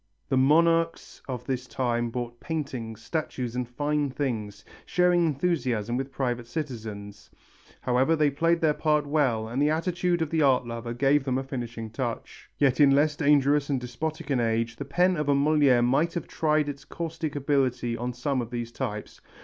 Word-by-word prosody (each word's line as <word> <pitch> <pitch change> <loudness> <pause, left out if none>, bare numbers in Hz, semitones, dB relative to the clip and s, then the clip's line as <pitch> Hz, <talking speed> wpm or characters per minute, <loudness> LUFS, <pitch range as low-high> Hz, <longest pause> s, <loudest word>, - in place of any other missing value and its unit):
The 135 - +2
monarchs 165 +5 +2
of 125 -2 -5
this 130 -1 -3
time 120 -2 -1
bought 120 0 -5
paintings, 120 -6 -5
statues 125 -6 -3
and 125 -1 -2
fine 145 +3 -1
things, 110 -7 -4 0.2
sharing 180 -1 +3
enthusiasm 130 -8 -1
with 135 +1 -3
private 125 -3 -2
citizens. 110 -7 -6 0.5
However, 130 +6 +2
they 150 -2 +2
played 165 +4 +1
their 155 -2 +3
part 150 -1 +1
well 135 -7 +1
and 120 +5 -2
the 145 - +4
attitude 175 +1 0
of 155 - -5
the 160 -1 +1
art 130 -4 +3
lover 115 0 -5
gave 140 +3 +3
them 130 -2 0
a 135 - -2
finishing 120 -4 -6
touch. 120 -1 -5
Yet 135 -3 +2
in 145 -2 +7
less 145 +2 +3
dangerous 145 -1 +3
and 135 -2 +1
despotic 150 +5 -5
an 130 - +2
age 115 0 0
the 140 - -5
pen 180 +7 +2
of 150 -1 -1
a 140 - +4
Molière 140 -4 +4
might 150 +8 +1
have 170 - -3
tried 155 -1 +1
its 140 -1 -6
caustic 165 -2 -5
ability 130 -4 0
on 120 +2 -3
some 130 +2 -1
of 115 - -6
these 120 -1 -4
types. 105 -2 -5
135 Hz, 180 wpm, -27 LUFS, 120-150 Hz, 0.5 s, in